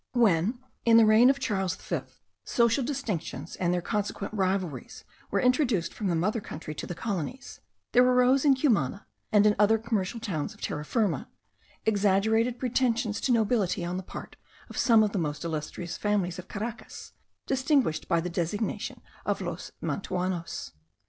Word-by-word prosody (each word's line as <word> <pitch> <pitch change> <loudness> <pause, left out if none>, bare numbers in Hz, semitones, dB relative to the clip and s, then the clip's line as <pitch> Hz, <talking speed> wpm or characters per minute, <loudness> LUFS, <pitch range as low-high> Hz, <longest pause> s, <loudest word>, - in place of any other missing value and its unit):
When, 220 -2 +3 0.3
in 230 -1 +6
the 225 - +7
reign 220 +4 +7
of 275 - +3
Charles 190 -7 -1
V, - - -3 0.4
social 235 +3 +2
distinctions 200 - -4
and 175 -1 +1
their 180 -1 0
consequent 205 -1 -3
rivalries 185 -7 -2 0.3
were - - +1
introduced 250 - +2
from 210 - -3
the 175 - +1
mother 210 +7 0
country 155 -4 -7
to - - -6
the 175 - -5
colonies, 220 - -4 0.3
there 245 - +6
arose 250 +1 +4
in 280 -3 +5
Cumana 205 - +1 0.3
and 210 -1 +5
in 210 0 +5
other 210 +2 +5
commercial 225 -1 -2
towns 180 -10 -3
of - - -21
Terra 150 - -3
Firma, 200 - 0 0.6
exaggerated 220 +3 +2
pretensions 240 -3 0
to 265 - +1
nobility 215 -6 +1
on 175 +1 -3
the - - -3
part 185 - -9 0.3
of - - -9
some 225 -3 +5
of 210 - 0
the 205 - -1
most 150 -2 -3
illustrious 160 +1 -4
families 195 -4 0
of 185 - -9
Caracas, 225 +3 -7 0.3
distinguished 265 - +1
by 170 -2 +2
the 170 - -3
designation 180 +5 -3 0.2
of - - -1
los - - -5
Mantuanos. 180 -3 -3
210 Hz, 160 wpm, -28 LUFS, 180-235 Hz, 0.6 s, the